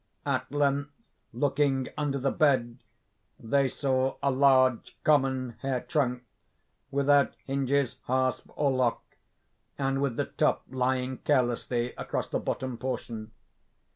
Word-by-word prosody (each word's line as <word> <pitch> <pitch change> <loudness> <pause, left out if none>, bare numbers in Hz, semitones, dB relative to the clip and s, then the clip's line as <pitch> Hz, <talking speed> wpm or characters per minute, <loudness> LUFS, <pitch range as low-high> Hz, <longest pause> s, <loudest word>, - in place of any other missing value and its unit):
At - - -1
length, 145 0 +1 0.4
looking 140 -2 +1
under 145 -2 -1
the 135 0 0
bed, 130 -5 +2 0.6
they 135 +4 +2
saw 130 0 0
a 140 - +3
large, 130 -2 +3
common 130 -4 +2
hair 135 -2 -1
trunk, 125 -7 -1 0.7
without 140 0 +3
hinges, 140 -1 0
hasp, 130 0 0
or 145 -2 +2
lock, 130 -2 +1 0.7
and 135 0 0
with 140 -4 0
the - - 0
top - - 0
lying 130 0 -1
carelessly 120 -3 0
across - - -2
the - - -1
bottom 130 -3 -3
portion. 115 -3 -4
130 Hz, 120 wpm, -28 LUFS, 125-140 Hz, 0.7 s, a